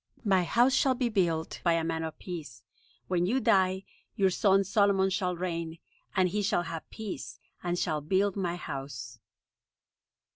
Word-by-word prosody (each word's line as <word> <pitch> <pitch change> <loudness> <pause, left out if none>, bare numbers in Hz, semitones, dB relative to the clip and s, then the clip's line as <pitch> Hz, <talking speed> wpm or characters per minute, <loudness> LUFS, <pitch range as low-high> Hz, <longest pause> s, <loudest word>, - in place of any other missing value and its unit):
My 190 -3 +3
house 240 +8 +4
shall 260 -1 +3
be 245 -1 0
built 170 -6 0
by 170 - +4
a 165 -1 +1
man 165 0 -1
of 160 -1 -5
peace. 150 - -7 0.4
When 180 -1 +1
you 250 +7 +2
die, 190 -4 +3 0.3
your 195 -2 +3
son 195 0 +4
Solomon 195 -1 +3
shall 180 -2 0
reign, 170 -2 -3 0.4
and 185 -1 +4
he 210 +3 -1
shall 200 -3 +1
have 165 -1 -6
peace, 135 - -6 0.2
and 175 0 -1
shall 155 -4 0
build 190 +6 +1
my 180 -3 -1
house." 135 -7 -6
180 Hz, 160 wpm, -29 LUFS, 165-195 Hz, 0.4 s, house